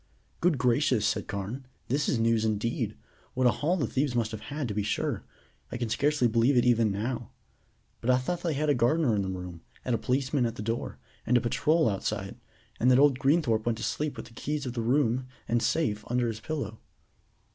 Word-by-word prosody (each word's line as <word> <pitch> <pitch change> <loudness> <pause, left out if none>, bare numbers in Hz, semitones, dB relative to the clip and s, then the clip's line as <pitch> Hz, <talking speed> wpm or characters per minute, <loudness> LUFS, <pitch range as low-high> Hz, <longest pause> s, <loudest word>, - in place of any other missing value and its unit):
"Good 170 -4 +2
gracious!" 125 -2 +2
said 105 -2 0
Carne. 105 +7 -5 0.2
"This 140 +4 0
is - - +2
news 115 -1 +2
indeed. 110 +1 -1 0.4
What 130 0 +1
a 120 - +6
haul 170 +9 0
the 145 - 0
thieves 130 +2 -1
must 115 -2 0
have 110 - -5
had, 145 -2 -3
to 105 - -3
be 105 - 0
sure. 100 - -1 0.5
I - - -3
can 120 -2 -2
scarcely 145 +2 +2
believe 120 +4 +3
it 120 - +4
even 115 -3 +3
now. 115 +4 -3 0.7
But 120 - -3
I 125 - +6
thought 170 +7 -2
they 165 -4 -1
had 150 +2 0
a 145 - +4
gardener 125 +2 +2
in 100 - +1
the 95 - -2
room, 90 -2 -6 0.2
a 125 - +1
policeman 130 0 +1
at 115 - -5
the 105 - -5
door, 115 +2 -3 0.3
and 125 - +3
a - - +4
patrol 155 +7 +2
outside, 100 -3 -2 0.4
and 125 - +4
that 125 - +6
old 140 -2 +5
Greenthorpe 135 -6 +2
went 115 -1 +1
to 110 - -6
sleep 145 +4 -2
with 110 - -6
the 115 - -15
keys 145 +4 -3
of 125 - -4
the 120 - -2
room 125 +1 +1 0.2
and 120 0 +1
safe 115 -4 0
under 120 0 +1
his 110 -1 -5
pillow?" 110 -6 -4
120 Hz, 215 wpm, -28 LUFS, 110-140 Hz, 0.7 s, a